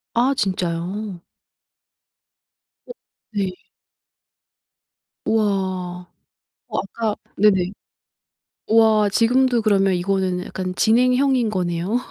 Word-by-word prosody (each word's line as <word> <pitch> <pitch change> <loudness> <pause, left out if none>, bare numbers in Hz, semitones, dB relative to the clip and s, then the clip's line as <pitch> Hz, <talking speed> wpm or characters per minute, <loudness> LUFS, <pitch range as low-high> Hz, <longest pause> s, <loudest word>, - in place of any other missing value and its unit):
아 250 +4 +3
진짜요? 185 0 -2 1.6
오. - - -9 0.4
네. 200 -3 0 1.8
우와. 185 -4 -1 0.6
어 - - -3
아까 215 +2 -2 0.2
네네. 190 -3 +3 1.0
우와. 220 -2 +4
지금도 245 +3 +3
그러면 195 -3 +2
이거는 185 0 -1
약간 185 -1 -5
진행형인 250 +2 +3
거네요? 180 +2 -1
200 Hz, 165 characters per minute, -21 LUFS, 185-225 Hz, 1.8 s, 우와